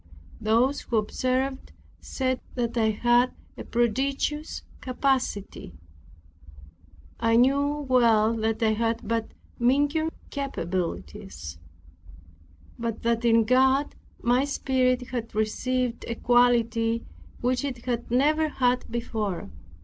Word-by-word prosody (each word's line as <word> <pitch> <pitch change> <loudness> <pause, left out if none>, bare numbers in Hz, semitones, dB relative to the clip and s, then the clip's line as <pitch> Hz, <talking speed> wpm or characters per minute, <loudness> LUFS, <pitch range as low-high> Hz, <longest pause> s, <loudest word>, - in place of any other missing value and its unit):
Those 230 +6 +2
who 230 - -1
observed 255 +5 -1 0.3
said 260 -1 -2
that 240 -2 -2
I 220 -2 +3
had 240 +3 +3 0.2
a - - -7
prodigious 270 +6 -1 0.2
capacity. 255 - -2 1.4
I 230 0 +3
well 255 -4 +3
knew 225 - -4
that 225 +1 0
I 220 -1 +3
had 230 0 -1
but 230 0 -1 0.3
meager 290 +6 +2 0.2
capabilities, 185 - -4 1.2
but 230 -1 -3
that 230 0 +1
in 230 -1 +5
God 265 +4 +3 0.3
my 245 +2 +2
spirit 255 -3 0
had 230 -4 -5
received 245 +3 -1
a 235 - -3
quality 230 -1 +2 0.3
which 250 +2 0
it 250 -4 -5
had 240 -2 -2
never 305 +6 +2
had 250 -3 +1
before. 220 -5 -3
240 Hz, 105 wpm, -26 LUFS, 225-260 Hz, 1.4 s, in